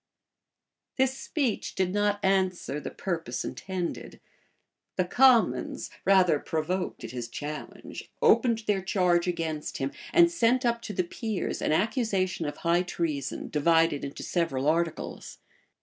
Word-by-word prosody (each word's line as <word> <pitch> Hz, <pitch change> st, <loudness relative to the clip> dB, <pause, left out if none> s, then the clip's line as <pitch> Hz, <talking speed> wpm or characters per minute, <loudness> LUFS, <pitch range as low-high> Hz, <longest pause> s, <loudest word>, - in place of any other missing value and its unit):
[*] -, -, -58 dB
This 265 Hz, 0 st, +2 dB
speech 270 Hz, -6 st, -2 dB
did 185 Hz, -1 st, 0 dB
not 205 Hz, 0 st, +1 dB
answer 185 Hz, -6 st, +1 dB
the -, -, -5 dB
purpose 165 Hz, -10 st, -3 dB
intended. 185 Hz, -3 st, -5 dB, 0.8 s
The 185 Hz, -, +1 dB
commons, 245 Hz, +4 st, +3 dB
rather 185 Hz, -6 st, +5 dB
provoked 165 Hz, +3 st, -3 dB
at 115 Hz, -, -6 dB
his 120 Hz, -2 st, -5 dB
challenge, 150 Hz, +5 st, -7 dB
opened 230 Hz, -3 st, +4 dB
their 205 Hz, -3 st, +1 dB
charge 180 Hz, -2 st, +2 dB
against 160 Hz, -3 st, -3 dB
him, 135 Hz, +1 st, -2 dB, 0.2 s
and 340 Hz, 0 st, +6 dB
sent 255 Hz, -4 st, +2 dB
up 235 Hz, -1 st, +1 dB
to 210 Hz, -, -6 dB
the 185 Hz, -, +1 dB
peers 215 Hz, +3 st, -3 dB
an -, -, 0 dB
accusation 190 Hz, -, 0 dB
of 145 Hz, -, -5 dB
high 170 Hz, +1 st, +2 dB
treason, 160 Hz, -6 st, -3 dB
divided 165 Hz, 0 st, +3 dB
into 140 Hz, 0 st, -6 dB
several 145 Hz, -6 st, -1 dB
articles. 165 Hz, +1 st, -1 dB
180 Hz, 135 wpm, -28 LUFS, 160-210 Hz, 0.8 s, and